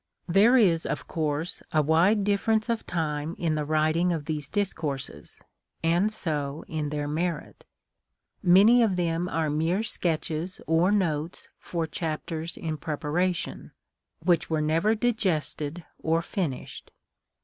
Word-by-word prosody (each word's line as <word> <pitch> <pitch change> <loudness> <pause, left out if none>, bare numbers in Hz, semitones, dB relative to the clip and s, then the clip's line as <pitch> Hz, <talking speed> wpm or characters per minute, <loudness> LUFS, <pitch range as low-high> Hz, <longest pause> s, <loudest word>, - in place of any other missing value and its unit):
Tliere 210 +8 +5
is, 165 -3 +1
of - - -3
course, 155 +1 -2
a 155 -1 +3
wide 175 +8 +3
difference 215 +2 +1
of 230 -1 -1
time 155 -2 -2
in 165 -3 0
the 155 -1 -1
writing 155 +3 +2
of 160 -4 -2
these 150 -2 -3
discourses, 150 - -3 0.4
and 175 +6 +2
so 150 -7 -3
in 155 -2 -3
their 145 0 -2
merit. 160 +1 -3 0.8
Many 205 +7 +6
of 215 -5 +3
them 175 0 0
are 160 -3 0
mere 165 +7 +1
sketches 165 -2 -2
or 165 +4 +3
notes 165 -6 -1
for 170 -2 -3
chapters 160 +1 -4
in 160 -2 -3
preparation, 160 +4 -2 0.5
which 170 -2 +2
were 160 -1 +1
never 165 +8 +2
digested 180 -8 -1
or 165 +1 +1
finished. 165 - -4
165 Hz, 130 wpm, -27 LUFS, 155-185 Hz, 0.8 s, Many